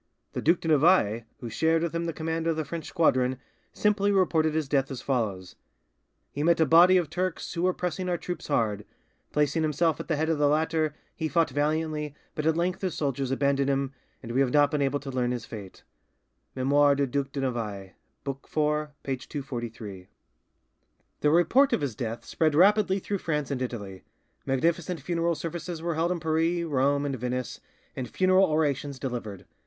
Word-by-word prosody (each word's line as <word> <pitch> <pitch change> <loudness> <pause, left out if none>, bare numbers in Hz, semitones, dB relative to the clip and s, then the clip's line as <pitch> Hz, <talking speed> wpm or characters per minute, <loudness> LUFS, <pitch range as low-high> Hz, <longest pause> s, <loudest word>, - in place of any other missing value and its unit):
The - - -3
Duc 170 +3 +3
de - - -4
Navailles, 145 - +4 0.2
who 120 - -5
shared 160 +5 +2
with 170 - -2
him 170 0 -1
the 165 - -1
command 165 +1 -3
of 165 - +2
the 155 -1 -2
French 165 -1 -5
squadron, 130 -7 +2 0.3
simply 205 -1 +2
reported 160 -5 +2
his 155 -3 0
death 135 -1 +1
as 135 -3 -5
follows: 105 -9 -2 0.8
"He 145 - -4
met 170 +2 +3
a 160 - +5
body 175 +4 +7
of 175 -3 +1
Turks 180 +1 -3
who 170 - -3
were 185 +1 +2
pressing 180 +1 -3
our 175 - 0
troops 175 +1 -6
hard: 105 -2 0 0.5
placing 150 +2 +1
himself 155 +1 +1
at - - -6
the 160 - +1
head 155 +2 0
of 160 -2 0
the 145 - +4
latter, 155 0 +1 0.2
he 160 - -2
fought 165 -2 +1
valiantly, 150 +1 -1 0.2
but 155 0 -2
at 160 0 +2
length 180 +2 -1
his 185 -4 -2
soldiers 135 -2 -1
abandoned 140 +1 +1
him, 135 0 0 0.3
and 115 - -6
we 125 - +1
have 130 -2 +2
not 145 0 +4
been 150 - 0
able 140 +1 +1
to 140 -1 -7
learn 125 -1 0
his 120 -2 -3
fate" 100 -4 -10 0.7
('Memoires 140 +2 +3
du 140 - +2
Duc 135 +1 -2
de 140 - -3
Navailles', 105 -7 -3 0.3
book 135 -1 -4
iv. 150 0 0
P. 135 -1 -2
243) 120 -9 -7 1.1
The 150 - +3
report 245 - +4
of - - +1
his 135 -6 -2
death 115 -2 -4
spread 155 -2 +1
rapidly 195 +2 +4
through 200 0 -3
France 150 -5 -2
and 130 -2 -2
Italy; 100 -7 -5 0.5
magnificent 165 +5 0
funeral 170 +3 0
services 170 +1 -5
were 170 +1 -2
held 165 +3 0
in 180 - -1
Paris, 165 +2 +1
Rome, 140 -2 +1
and 140 -2 -1
Venice, 125 0 -3 0.4
and 125 -2 -4
funeral 185 +1 +4
orations 145 -3 0
delivered. 120 -7 -5
150 Hz, 190 wpm, -27 LUFS, 135-165 Hz, 1.1 s, body